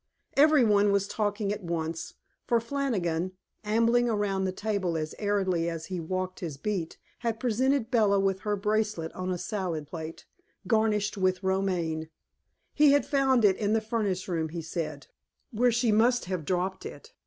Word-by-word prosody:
Every 300 -1 +6
one 205 -2 +4
was 200 0 +1
talking 205 -1 -1
at 210 - -6
once, 165 -1 -3 0.3
for 235 -2 +3
Flannigan, 200 -9 -1 0.3
ambling 230 +3 +3
around 200 -3 0
the 185 - 0
table 190 -4 -1
as 155 -1 -3
airily 190 -5 +1
as 165 -1 -5
he 180 - -2
walked 185 +2 -3
his 160 -6 -5
beat, 180 0 -3 0.2
had 230 -2 -2
presented 255 +1 +1
Bella 210 -5 +4
with 195 -1 +1
her 210 +1 -1
bracelet 210 -4 -1
on 185 0 -4
a 180 - -1
salad 175 -6 -3
plate, 160 +1 -8 0.4
garnished 210 0 +1
with 185 0 +1
romaine. 180 -5 -1 0.6
He 295 -2 +5
had 285 - +3
found 265 -5 +3
it 190 -2 +4
in 210 -1 0
the 225 - +3
furnace 215 -4 -2
room, 165 -3 -1
he 165 +1 -5
said, 155 -4 -4 0.5
where 245 +2 +3
she 235 0 +2
must 235 +2 +3
have 180 -4 -3
dropped 185 +2 -1
it. 455 +2 -10
200 Hz, 165 wpm, -28 LUFS, 175-225 Hz, 0.6 s, Every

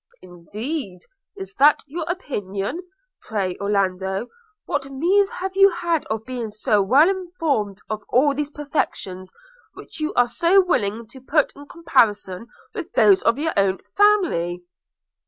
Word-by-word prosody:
'Indeed! 190 - -6 0.4
is 195 0 -8
that 290 +2 +5
your 320 +3 -5
opinion? 230 - -4 0.2
– - - -54
Pray, 195 -5 -2
Orlando, 195 +1 -1 0.4
what 280 -1 -3
means 375 +9 +2
have 380 +1 -5
you 390 0 +7
had 345 -3 -1
of 220 0 -4
being 245 -3 -4
so 210 0 +1
well 265 - +5
informed 330 - -1
of 215 -1 -4
all 280 +3 +3
these 290 +1 -3
perfections, 200 -11 -4 0.4
which - - -10
you 310 0 -1
are 245 - +5
so 340 +10 +3
willing 230 - 0
to 260 +2 -13
put 295 +3 +1
in 285 0 -13
comparison 230 - 0 0.3
with - - -6
those 390 -1 +5
of 230 - +2
your 320 +2 -1
own 195 -1 +2 0.2
family?' 335 - +2
260 Hz, 145 wpm, -22 LUFS, 200-330 Hz, 0.4 s, you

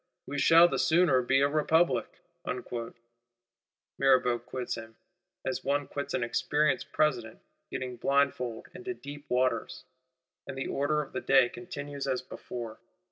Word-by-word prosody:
We 145 +1 -4
shall 165 +4 +7
the - - -2
sooner 160 -6 +4
be 135 +2 +2
a 140 - +5
Republic.' 155 +3 +1 1.8
Mirabeau 130 -3 +4
quits 125 +1 -5
him, 115 0 -8 0.5
as 130 0 -2
one 145 +1 0
quits 140 - -4
an 125 - 0
experienced 145 +4 0
President 125 -8 0 0.3
getting 125 -1 -5
blindfold 130 -3 0
into 370 0 -6
deep 145 - -10
waters; 125 -2 0 0.6
and 135 - -6
the 135 - -2
order 150 +2 +1
of - - -15
the 130 - -2
day 135 -3 +5
continues 145 -6 -6
as 130 -1 -1
before. 120 -3 -7
135 Hz, 135 wpm, -29 LUFS, 125-145 Hz, 1.8 s, shall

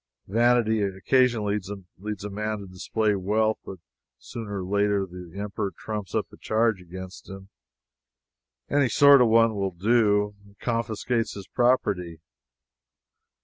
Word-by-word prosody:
Vanity 115 0 +2
occasionally 105 +2 +1 0.4
leads 105 -1 -5
a 105 - -4
man 105 +1 -2
to 100 - -8
display 105 +3 -1
wealth, 105 +3 0
but 95 - -8 0.4
sooner 100 - -6
or - - -6
later 100 0 +1
the 90 0 -10
Emperor 100 -1 -3
trumps 105 -4 -5
up - - +1
a - - -13
charge 110 -3 +1
against 95 +2 -10
him 95 0 -10 1.2
any 140 -3 +2
sort 140 +2 +7
of 125 - +5
one 115 0 +4
will 100 -2 -1
do 105 +2 +2
and 100 0 -21
confiscates 115 0 -2
his 100 -2 -8
property. 100 -9 +1
105 Hz, 135 wpm, -25 LUFS, 95-115 Hz, 1.2 s, sort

